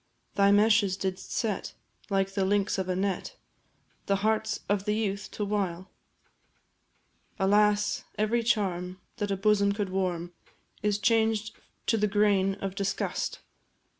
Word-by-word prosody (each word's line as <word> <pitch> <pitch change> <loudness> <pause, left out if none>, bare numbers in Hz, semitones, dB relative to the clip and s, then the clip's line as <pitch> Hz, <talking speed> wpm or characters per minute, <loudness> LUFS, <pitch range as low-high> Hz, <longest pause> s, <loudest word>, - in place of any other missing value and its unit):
Thy 200 0 +4
meshes 205 -2 +4
didst 190 -1 -4
set, 215 -5 -2 0.4
like 195 -1 +1
the 195 - 0
links 200 0 +1
of 185 -1 -2
a 185 - +1
net, 195 - -2 0.7
The 200 - +3
hearts 220 0 0
of 200 -1 0
the 210 - +1
youth 200 -2 -2
to 210 - -2
wile? 190 -3 -2 1.5
Alas 205 +1 +2
every 215 +3 +1
charm 185 -5 -1 0.2
that 205 -3 -2
a 195 - 0
bosom 200 0 +3
could 205 -2 -2
warm 180 -2 -2 0.5
Is 210 -1 +1
changed 220 0 +1 0.3
to 225 - +2
the 210 0 +2
grain 200 -2 +2
of 195 -1 -4
disgust! 195 0 -2
200 Hz, 135 wpm, -28 LUFS, 190-210 Hz, 1.5 s, Thy